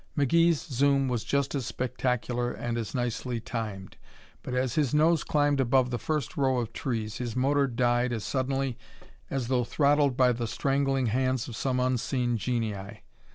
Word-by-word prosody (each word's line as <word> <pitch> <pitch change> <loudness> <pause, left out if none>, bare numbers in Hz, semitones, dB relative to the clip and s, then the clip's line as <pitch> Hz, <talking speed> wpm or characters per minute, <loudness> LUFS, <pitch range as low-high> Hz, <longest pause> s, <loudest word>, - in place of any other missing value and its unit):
McGee's 165 +3 +4
zoom 140 -1 +1
was 120 -3 -1
just 140 -1 0
as 135 -5 -2
spectacular 125 -1 -1
and 120 -1 -4
as 115 +2 -4
nicely 120 0 -2
timed, 110 -5 -6 0.4
but 125 - -5
as 125 -1 0
his 150 -3 +1
nose 160 +1 +4
climbed 145 -1 +1
above 130 0 +3
the 120 - -2
first 150 +1 -2
row 135 -2 +2
of 115 -2 -3
trees 110 -5 -3
his 120 -3 -4
motor 140 +2 +2
died 120 0 +1
as 115 -3 -3
suddenly 135 -1 -1 0.5
as 130 -3 -2
though 125 -1 +1
throttled 145 0 +2
by 125 -1 +5
the 120 -1 -2
strangling 135 +3 0
hands 130 +3 0
of 120 - -7
some 125 +1 -1
unseen 125 -1 0
genii. 110 -3 -3
125 Hz, 165 wpm, -28 LUFS, 120-135 Hz, 0.5 s, by